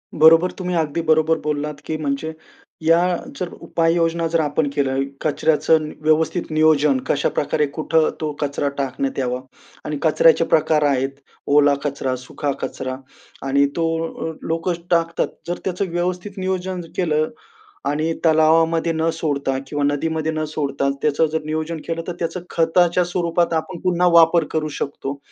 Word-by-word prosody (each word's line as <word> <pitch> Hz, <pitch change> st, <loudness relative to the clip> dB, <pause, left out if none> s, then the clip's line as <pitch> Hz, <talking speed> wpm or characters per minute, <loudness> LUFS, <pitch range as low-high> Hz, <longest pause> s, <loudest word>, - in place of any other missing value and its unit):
बरोबर, 165 Hz, +3 st, +6 dB
तुम्ही 180 Hz, -1 st, -2 dB
अगदी 160 Hz, 0 st, 0 dB
बरोबर 160 Hz, +1 st, +3 dB
बोललात, 150 Hz, 0 st, -2 dB
की 160 Hz, -, -2 dB
म्हणजे 150 Hz, +1 st, -3 dB, 0.5 s
या 165 Hz, +1 st, +4 dB, 0.4 s
जर 180 Hz, -, -2 dB
उपाययोजना 165 Hz, 0 st, +1 dB
जर 165 Hz, +1 st, +1 dB
आपण 150 Hz, -1 st, 0 dB
केल्या, 135 Hz, -2 st, +1 dB, 0.3 s
कचऱ्याचं 155 Hz, +1 st, +2 dB
नी -, -, -8 dB
व्यवस्थित 155 Hz, +2 st, +1 dB
नियोजन 155 Hz, -3 st, +4 dB
कशाप्रकारे 150 Hz, +1 st, +1 dB
कुठं 160 Hz, 0 st, +2 dB
तो 155 Hz, -1 st, -1 dB
कचरा 145 Hz, 0 st, -1 dB
टाकण्यात 135 Hz, 0 st, -2 dB
यावा 125 Hz, -1 st, -1 dB, 0.5 s
आणि 150 Hz, -1 st, -3 dB
कचऱ्याचे 165 Hz, +1 st, +4 dB
प्रकार 155 Hz, -1 st, +3 dB
आहेत. 135 Hz, -1 st, +1 dB, 0.4 s
ओला 145 Hz, 0 st, +5 dB
कचरा, 135 Hz, -3 st, -2 dB
सुखा 130 Hz, +3 st, -4 dB
कचरा 130 Hz, 0 st, -4 dB, 0.5 s
आणि 140 Hz, +1 st, +3 dB
तो 165 Hz, -, 0 dB, 0.2 s
लो 160 Hz, -, -5 dB, 0.2 s
लोक 165 Hz, +2 st, -1 dB, 0.2 s
टाकतात. 170 Hz, -1 st, +1 dB, 0.2 s
जर 175 Hz, +1 st, -2 dB
त्याचं 190 Hz, +1 st, -2 dB
व्यवस्थित 180 Hz, +3 st, -2 dB
नियोजन 185 Hz, -1 st, -2 dB
केलं 155 Hz, -3 st, +1 dB, 0.6 s
आणि 155 Hz, +3 st, 0 dB
तलावामध्ये 165 Hz, +1 st, +4 dB
न 160 Hz, +1 st, +1 dB
सोडता 140 Hz, -4 st, -1 dB
किंवा 145 Hz, 0 st, -2 dB
नदीमध्ये 155 Hz, +2 st, 0 dB
न 155 Hz, 0 st, -2 dB
सोडता 140 Hz, -2 st, -1 dB
त्याचं 150 Hz, +1 st, +2 dB
जर 160 Hz, -, 0 dB
नियोजन 155 Hz, +1 st, -3 dB
केलं, 165 Hz, 0 st, -2 dB
तर 175 Hz, -, -3 dB
त्याचं 175 Hz, +2 st, -3 dB
खताच्या 175 Hz, +2 st, +3 dB
स्वरूपात 170 Hz, -1 st, 0 dB
आपण 165 Hz, +2 st, -2 dB
पुन्हा 180 Hz, -1 st, +2 dB
वापर 165 Hz, 0 st, +6 dB
करू 155 Hz, -1 st, -1 dB
शकतो 140 Hz, 0 st, -4 dB
160 Hz, 145 wpm, -21 LUFS, 145-165 Hz, 0.6 s, बरोबर